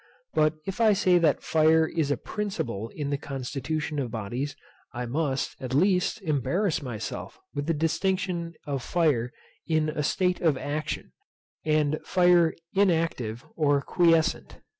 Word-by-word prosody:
But 155 0 +3
if 195 +4 -3
I 220 -2 +6
say 185 -3 +4
that 155 -5 +2
fire 160 0 +4
is 160 -4 -1
a 145 - +1
principle 120 - -4
in 145 -2 -3
the 140 - -1
constitution 145 +3 -3
of 130 -4 -2
bodies, 120 +6 -4 0.4
I 125 0 -3
must, 135 +1 -1
at 130 0 -3
least, 185 +5 +2
embarrass 165 - 0
myself 120 -6 -6 0.2
with 145 +1 -3
the 165 - +1
distinction 170 +1 -1
of 140 -3 -2
fire 135 -7 +1 0.4
in 155 -2 +2
a 150 - -2
state 180 +5 +1
of 155 -5 +3
action, 150 +3 -4 0.5
and 155 -1 +1
fire 175 -3 +4 0.2
inactive, 165 - +1
or 145 -3 +3
quiescent. 165 -2 +2
155 Hz, 140 wpm, -27 LUFS, 140-175 Hz, 0.5 s, I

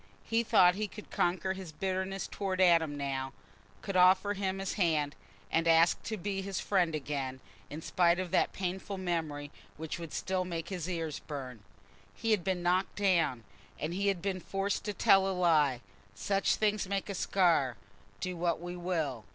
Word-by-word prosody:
He 230 0 +1
thought 195 -6 +5
he 210 +3 -2
could 210 +1 -12
conquer 185 +2 0
his 190 -4 -8
bitterness 190 +2 -2
towards 190 -2 -3
Adam 165 -5 +4
now—could 135 +7 -6
offer 185 +2 +5
him 195 -1 -2
his 195 0 -3
hand, 155 -6 +1 0.4
and 165 0 +2
ask 165 +1 +5
to 220 - -3
be 195 +1 -3
his 195 0 -3
friend 180 -5 +1
again, 135 -3 -3 0.3
in 155 +2 -7
spite 175 0 +3
of 185 -2 -3
that 185 - +2
painful 190 +1 -4
memory 160 -6 -3 0.3
which 160 +2 -5
would 165 -3 -7
still 185 -1 -1
make 170 -3 -5
his 180 -3 -4
ears 165 -4 -3
burn. 130 -6 -7 0.6
He 225 - -1
had 210 -5 +2
been 185 -1 -1
knocked 180 +2 +1
down, 170 - +2 0.4
and 155 +3 -2
he 200 +2 -1
had 195 -4 0
been 195 -2 -1
forced 195 +2 -2
to 210 - -2
tell 195 0 +5
a 190 -1 -1
lie: 150 -8 +3 0.3
such 195 - +1
things 210 -3 0
make 195 -1 -1
a 200 - -3
scar, 170 - +2 0.4
do 185 -1 -3
what 170 -1 0
we 175 +1 -6
will. 160 -10 -2
180 Hz, 175 wpm, -31 LUFS, 160-195 Hz, 0.6 s, thought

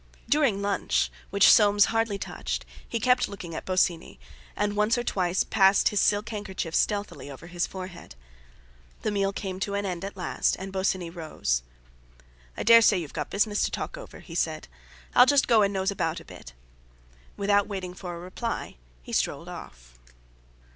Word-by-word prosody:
During 270 -10 +2
lunch, 200 0 0 0.2
which 200 -1 +6
Soames 205 -2 +5
hardly 225 -3 +1
touched, - - -4 0.2
he 230 - -1
kept 250 +2 +3
looking 180 -4 -8
at - - -6
Bosinney, 180 -3 0 0.4
and 205 +1 -1
once 210 +3 +2
or 240 - -1
twice 185 -5 0
passed 195 -1 +4
his 210 - 0
silk 205 +1 +2
handkerchief 195 -6 -5
stealthily 200 -11 -1
over 140 +3 -10
his 175 0 -2
forehead. 185 - -9 0.9
The 215 - 0
meal 195 -1 +1
came 190 -2 -5
to 200 0 -2
an 200 0 -1
end 180 -2 -4
at 195 0 -6
last, 180 - 0
and 190 +1 -7
Bosinney 190 -2 -1
rose. 155 - -2 1.0
"I - - -2
dare 230 +1 +8
say 210 -3 +5
you've 160 -5 -5
got 150 -2 -4
business 205 +1 +1
to - - +2
talk - - -4
over," - - -11
he 165 - -11
said; 160 -2 -2 0.5
"I'll 250 - +7
just 285 -1 +4
go 230 -3 +5
and 200 -1 +3
nose 190 0 0
about 165 -4 -2
a - - -14
bit." - - -12 0.8
Without 200 0 +2
waiting 190 -3 -5
for 180 -1 -7
a - - -8
reply 185 - -5 0.3
he - - -9
strolled - - -1
out. - - -9
195 Hz, 175 wpm, -27 LUFS, 175-210 Hz, 1.0 s, dare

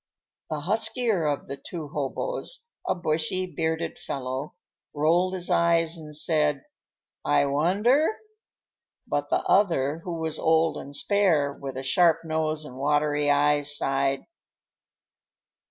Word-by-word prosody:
The 155 -2 -3
huskier 215 - +1
of 145 -1 -2
the 140 - -6
two 155 +1 -7
hoboes, 470 - -3 0.2
a - - +1
bushy, 170 +2 -1
bearded 160 -2 -3
fellow, 130 +1 -5 0.4
rolled 175 +5 +2
his 180 -1 -3
eyes 170 -1 +3
and 155 -2 -8
said, 150 -2 +1 0.6
"I 145 -1 +3
wonder?" 195 - +2 1.0
But - - -2
the - - +1
other, 165 -7 +2
who 170 0 -5
was 160 -1 -3
old 160 0 +2
and 140 +1 -8
spare, 165 -8 +2
with 135 -2 -7
a 130 - -4
sharp 165 +4 +3
nose 155 -1 -1
and 130 -3 -10
watery 145 +1 +1
eyes, 145 0 +3
sighed. 135 0 0
155 Hz, 125 wpm, -26 LUFS, 145-175 Hz, 1.0 s, eyes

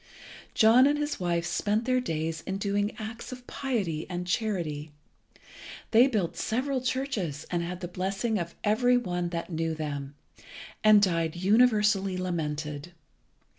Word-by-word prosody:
John 235 +4 +6
and 295 +1 +2
his 295 -3 -2
wife 170 -1 0
spent 205 +6 0
their 255 0 +2
days 160 -7 -3
in 190 0 -2
doing 205 +1 -1
acts 225 +3 -7
of 250 -1 -9
piety 200 - -2
and 180 -1 -3
charity. 175 -7 -2 1.0
They 235 +3 +7
built 210 -10 -1
several 260 +3 -1
churches, 245 - -2
and 175 -1 0
had 180 +1 -5
the 175 - -3
blessing 195 +5 -1
of 170 -1 -5
every 245 +4 +3
one 180 -7 -2
that 170 +1 -4
knew 165 0 -1
them, 145 -2 -5 0.7
and 215 -1 +7
died 165 -4 +1
universally 210 -1 +3
lamented. 155 -3 -3
190 Hz, 140 wpm, -28 LUFS, 170-225 Hz, 1.0 s, They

